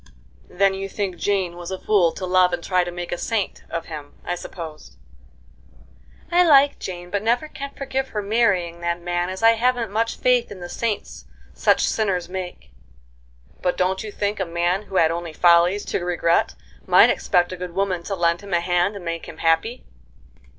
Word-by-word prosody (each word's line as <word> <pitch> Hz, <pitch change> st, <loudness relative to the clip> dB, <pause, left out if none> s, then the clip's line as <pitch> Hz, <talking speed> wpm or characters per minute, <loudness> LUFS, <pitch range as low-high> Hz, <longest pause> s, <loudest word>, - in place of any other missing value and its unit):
"Then 195 Hz, +2 st, +2 dB
you 195 Hz, 0 st, -5 dB
think 195 Hz, -3 st, -3 dB
Jane 190 Hz, -2 st, 0 dB
was 175 Hz, -1 st, -7 dB
a 190 Hz, -, -3 dB
fool 185 Hz, -5 st, +3 dB
to 185 Hz, -, -5 dB
love 180 Hz, -1 st, +3 dB
and 175 Hz, -1 st, -3 dB
try 185 Hz, -1 st, +2 dB
to 175 Hz, -, -5 dB
make 175 Hz, 0 st, -6 dB
a 175 Hz, -, -3 dB
saint 220 Hz, -4 st, -2 dB
of 165 Hz, 0 st, -4 dB
him, 150 Hz, -3 st, -9 dB
I -, -, -1 dB
suppose?" 160 Hz, -, -9 dB, 1.3 s
"I 355 Hz, +1 st, +5 dB
like 285 Hz, -4 st, +5 dB
Jane, 175 Hz, -1 st, -7 dB
but 205 Hz, -, 0 dB
never 240 Hz, +7 st, +1 dB
can 280 Hz, -2 st, -7 dB
forgive 270 Hz, -1 st, -2 dB
her 210 Hz, -4 st, -4 dB
marrying 200 Hz, -6 st, +1 dB
that 170 Hz, 0 st, -1 dB
man, 175 Hz, 0 st, -2 dB
as 190 Hz, +4 st, -6 dB
I 225 Hz, -, +8 dB
haven't 235 Hz, -1 st, 0 dB
much 225 Hz, +2 st, -1 dB
faith 250 Hz, -1 st, +2 dB
in 200 Hz, -, -8 dB
the 175 Hz, 0 st, -7 dB
saints 225 Hz, +1 st, -3 dB, 0.3 s
such -, -, +2 dB
sinners 190 Hz, -5 st, 0 dB
make." 180 Hz, -, -7 dB, 0.9 s
"But 180 Hz, -, 0 dB
don't 185 Hz, +2 st, 0 dB
you 215 Hz, -, -6 dB
think 205 Hz, +1 st, -2 dB
a -, -, +1 dB
man 175 Hz, +3 st, 0 dB
who -, -, -8 dB
had 165 Hz, -3 st, +4 dB
only 170 Hz, -1 st, -4 dB
follies 175 Hz, +4 st, +4 dB
to 175 Hz, -, -2 dB
regret 170 Hz, -1 st, +1 dB, 0.3 s
might -, -, +7 dB
expect 175 Hz, 0 st, +1 dB
a -, -, -4 dB
good 180 Hz, -1 st, -7 dB
woman 190 Hz, -3 st, 0 dB
to 195 Hz, -, -2 dB
lend 170 Hz, 0 st, +1 dB
him 200 Hz, -3 st, -3 dB
a -, -, +3 dB
hand 175 Hz, +3 st, +1 dB
and 190 Hz, -3 st, -8 dB
make 165 Hz, 0 st, -4 dB
him 160 Hz, -, -10 dB
happy?" 165 Hz, +11 st, 0 dB
185 Hz, 195 wpm, -22 LUFS, 175-205 Hz, 1.3 s, I